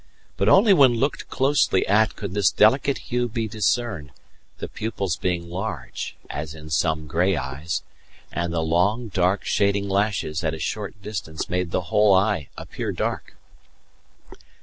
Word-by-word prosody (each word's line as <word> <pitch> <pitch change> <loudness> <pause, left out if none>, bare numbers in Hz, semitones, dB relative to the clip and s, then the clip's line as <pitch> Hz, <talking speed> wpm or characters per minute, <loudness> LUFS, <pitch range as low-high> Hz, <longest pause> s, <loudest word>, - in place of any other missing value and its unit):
But 100 +3 +2
only 200 - +6
when 135 -8 +6
looked 140 +5 -1
closely 135 -8 +2
at 110 +3 +3
could 100 -3 -6
this 100 -3 +3
delicate 135 +6 +3
hue 125 0 +1
be 110 0 -2
discerned, 110 - -1 0.5
the - - -5
pupils 100 -6 -3
being 85 -1 -2
large, 95 +6 -5
as 75 +1 -5
in 80 0 -11
some 80 +1 +1
grey 90 +4 +1
eyes, 65 +5 -4 0.5
and 85 -1 -2
the 80 -1 -1
long, 100 +8 +1
dark, 95 +1 +1
shading 100 0 +1
lashes 100 -6 0
at 80 0 -1
a - - -9
short 105 +6 -4
distance 90 -7 -5
made 90 -1 -1
the 90 - 0
whole 105 -2 +5
eye 95 -7 +1
appear - - -4
dark. - - -3
100 Hz, 150 wpm, -23 LUFS, 85-110 Hz, 0.5 s, only